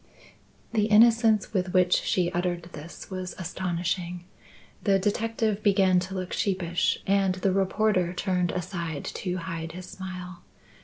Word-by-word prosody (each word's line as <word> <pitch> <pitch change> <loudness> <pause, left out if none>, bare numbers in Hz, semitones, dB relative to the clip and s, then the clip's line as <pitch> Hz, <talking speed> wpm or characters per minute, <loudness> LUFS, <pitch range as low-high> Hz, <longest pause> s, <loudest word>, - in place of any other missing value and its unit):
The 215 -2 +2
innocence 225 -1 +5
with 185 -2 -1
which 180 -1 +4
she 175 -2 +1
uttered 175 -1 -1
this 155 +6 -10
was 185 -1 -5
astonishing. 175 -1 -3 0.6
The 195 -2 +4
detective 215 +1 0
began 190 -3 +4
to 185 +2 -5
look 185 -1 -4
sheepish 180 -4 0
and 195 -1 +2
the 185 +1 +1
reporter 195 -1 +2
turned 180 -1 0
aside 170 -4 -4
to 180 -2 -3
hide 165 -2 -5
his 180 +1 -8
smile. 180 -1 -8
185 Hz, 135 wpm, -27 LUFS, 175-195 Hz, 0.6 s, innocence